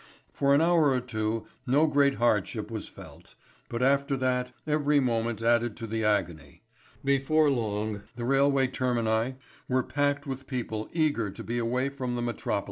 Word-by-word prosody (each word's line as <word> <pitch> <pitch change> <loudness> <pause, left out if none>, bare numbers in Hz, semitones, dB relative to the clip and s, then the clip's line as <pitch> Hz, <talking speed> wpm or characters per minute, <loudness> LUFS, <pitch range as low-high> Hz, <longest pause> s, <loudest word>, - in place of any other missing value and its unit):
For 140 0 +2
an 145 - +4
hour 165 -3 +4
or 130 -1 +2
two 110 -2 -3 0.2
no 140 +5 +4
great 140 -2 +3
hardship 110 -1 0
was 110 -2 -5
felt, - - -14 0.3
but 120 +1 -2
after 140 +1 +2
that 125 -1 0
every 150 -1 +2
moment 115 -3 -1
added 120 -1 +2
to 115 - -5
the 110 0 -2
agony. 90 -7 -1 0.4
Before 140 +2 +3
long 105 -4 -2
the 120 - -4
railway 135 +1 +3
termini 120 -1 0 0.3
were 130 0 +2
packed 145 +1 0
with 135 -1 -6
people 110 -4 -4
eager 150 -10 +1
to - - -9
be 120 +1 -2
away 125 +3 0
from 130 -3 -4
the 120 - -2
metropolis. 115 -3 -1
125 Hz, 165 wpm, -28 LUFS, 115-140 Hz, 0.4 s, an